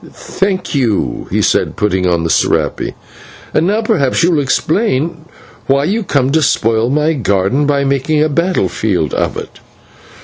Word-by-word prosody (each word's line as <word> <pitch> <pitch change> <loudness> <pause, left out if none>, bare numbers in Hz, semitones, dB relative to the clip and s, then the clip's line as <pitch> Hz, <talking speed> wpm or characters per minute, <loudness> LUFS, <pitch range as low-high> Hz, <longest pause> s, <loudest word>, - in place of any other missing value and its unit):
"Thank 190 -1 -3
you," 125 -8 -1
he - - 0
said, - - +1
putting 95 -3 0
on 85 -2 +1
the 85 - -1
/serape/. - - 0 0.6
"And 165 - +2
now 215 +3 0
perhaps 140 -6 +1
you 175 - +3
will 155 -4 +2
explain 160 - -1 0.4
why 140 +1 +2
you 215 +8 -1
come 140 -6 0
to 160 +2 +2
spoil 115 -3 +1
my 150 +3 +1
garden 110 +2 0
by 140 -1 +1
making 140 +3 0
a - - +2
battle 170 +5 0
field 90 -8 -1
of - - -1
it." - - -9
140 Hz, 165 wpm, -14 LUFS, 115-165 Hz, 0.6 s, you